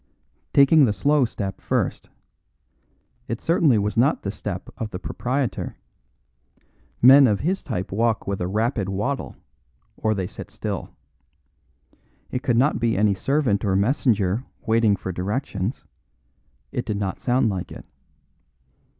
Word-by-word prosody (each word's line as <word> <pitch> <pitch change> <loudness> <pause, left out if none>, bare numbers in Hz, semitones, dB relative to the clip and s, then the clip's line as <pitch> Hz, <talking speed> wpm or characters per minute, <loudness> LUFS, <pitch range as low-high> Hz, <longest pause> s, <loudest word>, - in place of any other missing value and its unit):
Taking 140 +1 +6
the 105 - +1
slow 140 +7 +2
step 100 -4 -5
first: - - -2 1.2
it 115 - -3
certainly 160 -7 +3
was 105 +1 -1
not 125 +6 +2
the 100 - -2
step 100 -3 -6
of 110 - -3
the 90 - -5
proprietor. 125 +6 -3 1.3
Men 135 +2 +9
of 105 -3 +1
his 190 +5 0
type 90 +1 -4
walk 115 +2 0
with 100 -1 -3
a 90 - -1
rapid 105 0 -1
waddle, 105 +9 -3 0.6
or 110 -1 0
they 95 -2 -2
sit - - -9
still. - - -5 1.4
It 125 - -2
could 120 -3 +1
not 135 +5 +3
be 115 -3 +1
any 105 0 +3
servant 125 -1 0
or 95 -3 +1
messenger 105 -1 +1 0.2
waiting 110 -2 +3
for 95 - -5
directions. 100 +3 -3 0.9
It 120 - -2
did 105 -2 -1
not 100 -2 -3
sound 125 -1 +2
like 95 -3 -4
it. - - -10
110 Hz, 140 wpm, -23 LUFS, 100-130 Hz, 1.4 s, Men